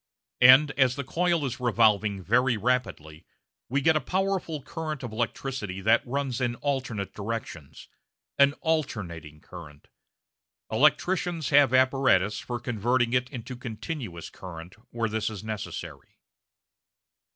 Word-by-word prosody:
And 130 +4 +8
as 130 -2 +4
the 140 - -4
coil 170 +2 0
is 130 -1 -4
revolving 105 -5 +2
very 125 +4 +2
rapidly 105 -10 -2 0.5
we 140 +4 0
get 160 +3 +4
a 155 - +2
powerful 185 -2 -2
current 155 -3 -5
of 120 - -5
electricity 115 -3 -3
that 110 +3 +4
runs 135 -1 -2
in 120 -1 0
alternate 130 -8 -3
directions 105 -8 -6 0.5
an 140 0 +6
"alternating" 90 - -3
current. 75 -5 -12 0.8
Electricians 155 +5 +1
have 140 -3 +5
apparatus 130 -6 +3
for 120 -1 -5
converting 120 +1 0
it 125 0 +1
into 125 -1 -7
a - - -9
continuous 115 - -6
current 90 -1 -10 0.2
where 115 -1 -2
this 110 -1 -2
is 110 -2 -8
necessary. 110 -1 -7
125 Hz, 130 wpm, -27 LUFS, 105-140 Hz, 0.8 s, And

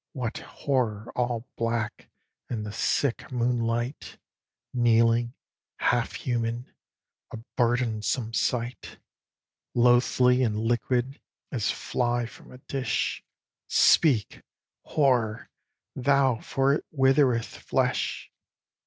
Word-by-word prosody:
What 125 -5 -3
horror 115 -6 -2
all 120 -1 -1
black, 115 -1 -2 0.4
in 110 -3 -3
the 105 - -5
sick 130 +5 -1
moonlight, 120 +1 -1 0.6
Kneeling, 115 0 +3 0.4
half - - +1
human, 120 0 -3 0.6
a - - -7 0.2
burdensome 115 -1 0
sight; 120 +1 -2 0.8
Loathly 125 +1 +4
and 110 -4 +1
liquid, 120 +3 -1 0.3
as 115 -6 -1
fly 120 -1 -1
from 115 - -13
a 125 - -11
dish; 130 -3 -2 0.4
Speak, 130 -10 +3 0.4
Horror! 120 -7 +1 0.4
thou, 135 -2 +2
for 135 +1 +1
it 150 - -1
withereth 135 -4 +3
flesh. - - -1
120 Hz, 90 wpm, -27 LUFS, 115-130 Hz, 0.8 s, Loathly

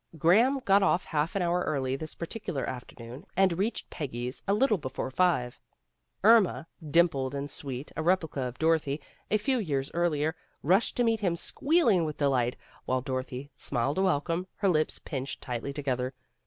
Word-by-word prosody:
Graham 220 - +4
got 200 +1 +5
off 185 -2 +2
half 155 +2 -1
an 195 - +1
hour 175 +1 +1
early 135 -5 -1
this 155 +3 -6
particular 175 -4 -4
afternoon, 125 +2 -8
and 190 -2 +4
reached 215 +4 -2
Peggy's 125 -3 -4
a 200 - +3
little 215 -3 +3
before 130 -1 -4
five. 135 -7 +1 0.6
Irma, 215 -6 +5 0.2
dimpled 140 -4 +2
and 140 0 -4
sweet, 135 -1 -6
a - - -2
replica 160 -4 +1
of 125 -1 -4
Dorothy 160 -3 +1 0.3
a 215 - +3
few 255 +4 0
years 140 -9 -2
earlier, 160 -2 +1 0.3
rushed 190 +9 +2
to 245 - +3
meet 225 -1 +2
him 180 -5 0
squealing 235 - +2
with 155 -2 -3
delight, 130 -4 +1 0.3
while 130 0 0
Dorothy 130 +1 -4
smiled 140 +6 -1
a - - +3
welcome, 170 0 0
her 200 - +1
lips 155 -3 +2
pinched 135 -2 -5
tightly 125 +1 -4
together. 130 -2 -2
155 Hz, 170 wpm, -29 LUFS, 135-185 Hz, 0.6 s, got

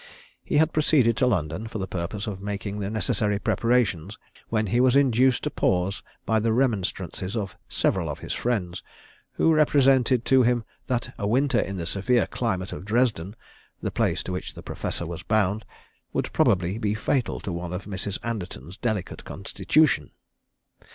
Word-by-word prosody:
He - - 0
had 160 +1 +3
proceeded 140 -7 +3
to 130 - +3
London, 90 -1 -1
for 110 - -5
the 95 - -2
purpose 95 +5 -4
of 100 -3 -5
making 100 0 -4
the 100 -1 -2
necessary 105 -1 0
preparations, 115 -4 +1 0.3
when 110 -1 +1
he 120 +4 +1
was 130 0 +4
induced 130 -2 +4
to - - -1
pause 95 +4 0 0.2
by 110 -1 +2
the 115 +1 +1
remonstrances 100 -4 -1
of 100 -3 -3
several 85 -5 0
of 75 - -4
his - - -5
friends, 95 -8 -2 0.5
who 165 - +3
represented 135 -5 +4
to 130 -1 +5
him 120 -1 +2 0.2
that 125 0 -2
a 100 - -1
winter 130 +6 +2
in 95 0 -2
the 85 - -3
severe 105 +7 +2
climate 95 -6 -2
of - - -7
Dresden 105 -3 0 0.4
the - - -3
place - - 0
to - - -5
which 90 - -5
the - - -10
Professor 85 - -3
was 85 0 -6
bound 105 +1 +1 0.5
would - - -2
probably 95 +2 +2
be 105 -2 0
fatal 125 +3 0
to 95 - -5
one 85 0 -4
of 90 +2 -5
Mrs. 100 0 -4
Anderton's 95 - -5
delicate 110 -6 -3
constitution. 150 - +1
105 Hz, 170 wpm, -25 LUFS, 95-125 Hz, 0.5 s, to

